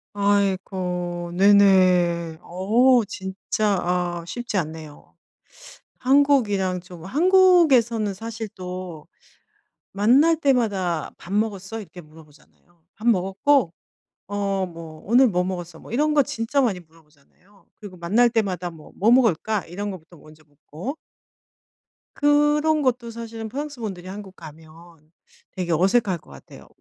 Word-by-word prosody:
아이고 185 -3 -1
네네. 185 -4 +4
어 230 +7 +3
진짜 195 +1 -2
아 175 -1 -2
쉽지 240 +1 -4
않네요. 155 -3 -7 0.8
한국이랑 250 -9 +2
좀 175 -2 -13
한국에서는 285 - +3
사실 225 +2 -6
또 180 -3 -7 0.9
만날 260 +12 +4
때마다 205 - 0
"밥 180 - -11
먹었어?" 210 0 -2
이렇게 180 -3 -11
물어보잖아요. 160 +2 -21
"밥 220 +4 -3
먹었고?" 195 - +2 0.6
어 195 -2 -1
뭐 165 -2 -11
"오늘 250 +4 +5
뭐 180 -5 +1
먹었어?" 175 -3 -6
뭐 - - -14
이런 300 +5 +1
거 290 - +5
진짜 230 +4 -2
많이 225 -8 0
물어보잖아요. 165 +4 -24
그리고 195 -3 -10
만날 215 +8 +2
때마다 185 -6 -1
뭐 160 -2 -15
"뭐 215 +4 +3
먹을까?" 220 -4 +2
이런 200 +4 -5
거부터 175 -2 -12
먼저 155 0 -18
묻고. 155 - -8 1.2
그런 295 +1 +2
것도 245 -3 -1
사실은 225 -1 -7
프랑스 285 0 -6
분들이 185 -4 -6
한국 195 -1 -9
가면 160 0 -13 0.8
되게 175 -2 -3
어색할 190 +2 +2
것 - - -22
같아요. - - -14
195 Hz, 265 characters per minute, -23 LUFS, 175-235 Hz, 1.2 s, 오늘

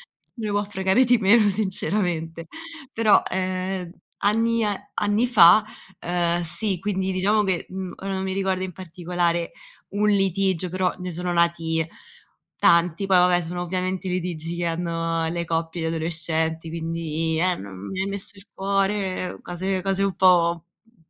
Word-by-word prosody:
me 225 -4 -9
ne - - -2
può 205 0 0
fregare 195 +4 +2
di 245 -1 +4
meno 210 +1 +5
sinceramente, 180 -5 -2 0.5
però, 220 -2 +4
ehm, 185 -1 -2 0.3
anni 225 +2 +2
a 205 -2 -2
anni 205 +4 +1
fa, 200 -3 +7 0.3
ehm, 175 0 0
sì, 190 +4 +1
quindi 190 0 -2
diciamo 205 +3 +2
che, 190 -3 -1
uhm, 185 -1 -6
ora 195 0 -3
non 190 - -2
mi 190 0 -2
ricordo 190 -1 -1
in 185 - -6
particolare 175 -1 -2 0.4
un 210 +1 +1
litigio, 195 -2 +1
però 185 0 0
ne 180 -1 -5
sono 180 +1 -3
nati 165 -2 +1 0.7
tanti, 170 +2 +3
poi 190 -1 +4
vabbè 180 0 +4
sono 175 +2 -4
ovviamente 185 +1 -3
i - - -2
litigi 170 -2 -3
che 175 0 -1
hanno 165 -1 -1
le 170 +1 -2
coppie 165 +1 -2
di 160 - 0
adolescenti, 160 0 -1
quindi: 165 -1 -2
“Eh 180 0 +2
non 100 0 -9
mi 190 - -4
hai 195 - -2
messo 200 0 -2
il 195 - -15
cuore”, 195 -1 -1
cose 185 +1 -3
cose 195 0 0
un 195 - -1
po 175 -2 +5 0.3
un 225 +1 -31
185 Hz, 160 wpm, -23 LUFS, 170-195 Hz, 0.7 s, fa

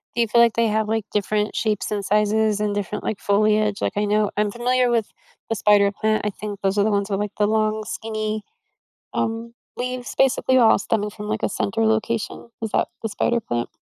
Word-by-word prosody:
Do 235 - +2
you 230 - +2
feel 235 +2 +4
like 235 -1 +5
they 230 -1 +2
have, 215 0 0
like, 220 -1 -1
different 210 +1 0
shapes 215 -2 -1
and 200 -2 -2
sizes 210 0 +2
and 210 -1 -1
different, 205 0 -3
like, 215 - -3
foliage? 210 0 +2
Like, - - 0
I 210 - +2
know 210 0 +2
I'm 210 -1 +1
familiar 245 +1 +1
with 230 -3 0 0.4
the 225 - 0
spider 200 -1 +4
plant, 215 +1 0
I - - +2
think 205 0 -7
those 195 +1 0
are 200 - +4
the 215 - +1
ones 200 0 0
with, 195 0 -1
like, 210 0 -3
the 210 - +3
long 215 0 +1
skinny, 215 0 -4 0.7
um, 225 +1 -2 0.2
leaves 250 0 -4
basically 260 -1 +3
all 235 -3 +6
stemming 210 0 -1
from, 210 0 -8
like, 215 0 -2
a - - +1
center 225 +3 -1
location. 220 +1 -1
Is 220 - -2
that - - +1
the 225 - -1
spider 240 +3 0
plant? 120 - -3
215 Hz, 215 wpm, -22 LUFS, 205-225 Hz, 0.7 s, all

